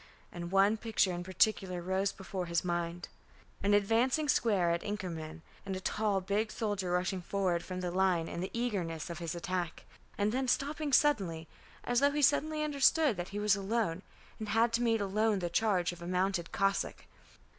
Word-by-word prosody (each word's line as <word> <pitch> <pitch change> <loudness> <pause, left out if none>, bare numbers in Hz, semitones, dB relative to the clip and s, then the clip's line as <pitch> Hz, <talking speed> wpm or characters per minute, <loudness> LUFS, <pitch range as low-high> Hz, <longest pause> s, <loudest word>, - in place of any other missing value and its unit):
And 170 -1 -6
one 195 +3 +4
picture 215 -4 +1
in 175 0 -4
particular 185 0 +1
rose 190 +3 0
before 190 -1 -5
his 170 +1 0
mind, 175 0 -2 0.5
an 205 +1 +3
advancing 235 +9 +2
square 205 -10 +2
at 170 0 0
Inkermann, 165 -6 -5 0.2
and 195 -1 -4
a - - -3
tall 205 0 0
big 205 +3 -1
soldier 205 -5 -2
rushing 180 +1 0
forward 180 -1 -1
from 185 -1 -5
the 180 -1 -2
line 180 -3 +2
in 170 - -5
the 185 - -3
eagerness 180 -10 -2
of 170 - -6
his 170 -1 -4
attack, 175 -1 -3 0.3
and 205 +1 +1
then 260 +2 -1
stopping 290 +3 0
suddenly 190 - +2 0.4
as 245 -1 +1
though 280 +1 +4
he 295 +1 -1
suddenly 305 +2 +2
understood 295 -2 +3
that 175 0 -4
he 200 - -6
was 210 -1 +3
alone, 200 -3 -1 0.4
and 215 -1 -5
had 225 +2 +3
to 235 - +2
meet 225 -2 +2
alone 210 +2 +1
the 175 -2 -3
charge 185 -4 +2
of 175 -1 -11
a 170 - -6
mounted 180 -1 0
Cossack. 195 0 -1
195 Hz, 185 wpm, -32 LUFS, 175-225 Hz, 0.5 s, one